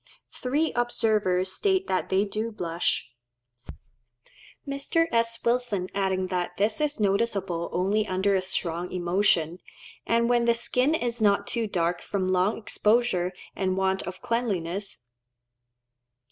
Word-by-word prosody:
Three 290 +5 0
observers 215 -6 +1
state 380 - +1
that 185 -1 -1
they 190 +2 +2
do 215 +3 -3
blush; 170 - -1 1.6
Mr. 280 +4 +1
S. 230 0 +1
Wilson 235 -6 0
adding 190 -1 0
that 180 -1 -3
this 215 +6 0
is 295 -3 0
noticeable 195 -4 0
only 200 +4 +1
under 190 +1 +1
a 190 - +2
strong 180 -2 -3
emotion, 175 -2 +1 0.5
and 235 0 +3
when 240 -1 +3
the 235 0 +4
skin 250 +5 +1
is 240 -5 -2
not 200 -1 +3
too 230 0 -1
dark 175 -2 0
from 190 -2 -2
long 185 +3 +2
exposure 210 -4 +1 0.2
and 185 -1 -1
want 190 0 +1
of 185 +1 -8
cleanliness. 200 - -2
200 Hz, 130 wpm, -26 LUFS, 185-235 Hz, 1.6 s, the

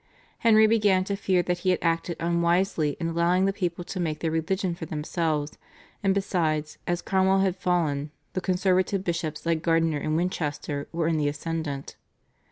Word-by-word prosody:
Henry 220 -1 +6
began 210 -4 +3
to 200 +1 -2
fear 185 -2 +1
that 175 0 -1
he 185 - 0
had 180 - +3
acted 165 0 0
unwisely 170 -2 +1
in 165 -1 -1
allowing 170 +3 +2
the 195 - +1
people 175 -3 -2
to 185 - -6
make 160 -3 -1
their 160 0 -2
religion 175 +3 -1
for 165 -1 -7
themselves, 155 -1 -2 0.4
and 195 -2 +2
besides, 160 -6 -1
as 175 0 -1
Cromwell 190 0 +3
had 190 -2 +1
fallen, 160 -6 0 0.2
the 185 - -2
conservative 185 +1 +1
bishops 165 -4 -3
like 165 -1 +1
Gardiner 165 -2 +2
of 155 - -1
Winchester 150 -4 -2
were 165 -1 -1
in 165 -1 +1
the 150 -1 +1
ascendant. 145 -2 -4
170 Hz, 175 wpm, -26 LUFS, 160-185 Hz, 0.4 s, Henry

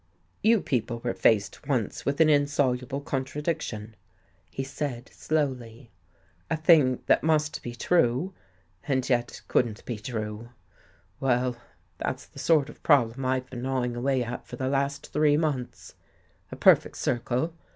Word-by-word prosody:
" - - -40
You 225 -4 +4
people 120 -2 -1
were 120 - -1
faced 105 +4 +1
once 125 -8 -1
with 140 +2 0
an 160 - +6
insoluble 140 -3 +1
contradiction," 135 -5 -3 0.5
he 135 - -4
said 135 -2 -5
slowly. 130 -6 -2 0.3
" 85 +2 -37
A - - 0
thing 150 -5 +4
that - - +4
must 155 -1 +1
be 120 0 -6
true 165 +4 +1 0.5
and 130 -2 0
yet 120 -2 0
couldn't 115 -3 0
be 120 -4 -4
true. 110 0 -5 0.7
Well, 125 -1 +1 0.4
that's - - -3
the - - -13
sort 155 -4 +3
of - - -13
problem 135 -3 +3
I've 130 0 0
been 125 -2 -6
gnawing 125 -2 -1
away 130 +1 +1
at 120 +1 -6
for - - -7
the 130 +1 -2
last 140 +1 -2
three 150 -1 +4
months. 150 -6 -3 0.6
A - - -5
perfect - - +4
circle. 125 +6 -1
130 Hz, 150 wpm, -27 LUFS, 120-145 Hz, 0.7 s, an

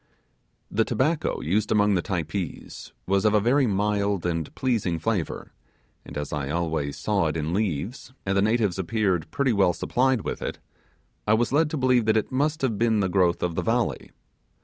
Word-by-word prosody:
The 110 - +2
tobacco 140 +9 0
used 100 +7 0
among 105 -1 +4
the 90 - +2
Typees 85 -1 -4
was 95 0 +1
of 105 0 +3
a - - +5
very 125 +5 +3
mild 100 -2 0
and 85 -3 -2
pleasing 110 -10 0
flavour, 95 0 -2 0.5
and 70 - -9
as 75 0 -4
I 70 -2 -2
always 80 -3 -2
saw - - +1
it - - -2
in 80 +2 -2
leaves, 105 - -2
and 95 0 0
the 100 - +3
natives 105 -3 +1
appeared 95 -4 0
pretty 135 -3 +1
well 95 -4 +3
supplied 130 +3 +1
with - - -4
it, - - -4 0.7
I 105 - +5
was 120 +3 0
led 155 +1 +3
to 155 - -3
believe 130 -3 +3
that 110 0 +3
it 110 - -1
must 145 +3 0
have 115 -6 0
been 115 -2 +2
the 95 -2 +1
growth 90 -2 +2
of 90 -1 0
the - - -1
valley. 115 - -1
105 Hz, 190 wpm, -25 LUFS, 85-120 Hz, 0.7 s, a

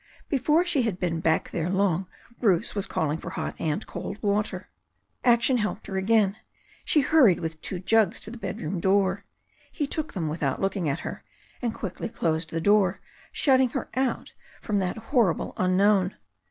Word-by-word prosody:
Before 300 +5 +3
she 340 -6 +1
had 220 -6 -1
been 170 -3 -1
back 160 0 +1
there 170 0 -2
long 190 -2 +1 0.3
Bruce 200 -2 +2
was 200 -2 -3
calling 155 0 -1
for - - -6
hot - - -4
and 160 +6 -1
cold 200 - -6
water. 205 +1 0 0.6
Action 240 +1 +4
helped 210 0 -2
her 195 - -5
again. 200 +1 +2 0.5
She 300 - +3
hurried 260 - +5
with 160 -1 -5
two 185 - -4
jugs 215 +2 +2
to 215 - -6
the 240 - -8
bedroom 185 -3 -4
door. 195 +1 +2 0.5
He 295 - -2
took 310 +2 -4
them 170 -5 -2
without 150 -3 -1
looking 195 -4 0
at 140 +4 -2
her, - - -6 0.4
and 240 -2 0
quickly 205 0 -5
closed 160 -4 -1
the 165 - -2
door, 200 0 +3 0.3
shutting 260 -3 +3
her - - -4
out 260 -1 -1 0.3
from 210 -3 -1
that 185 +1 -2
hor 225 - +2
rible - - -6
unknown. 185 +1 +3
200 Hz, 175 wpm, -26 LUFS, 175-230 Hz, 0.6 s, hurried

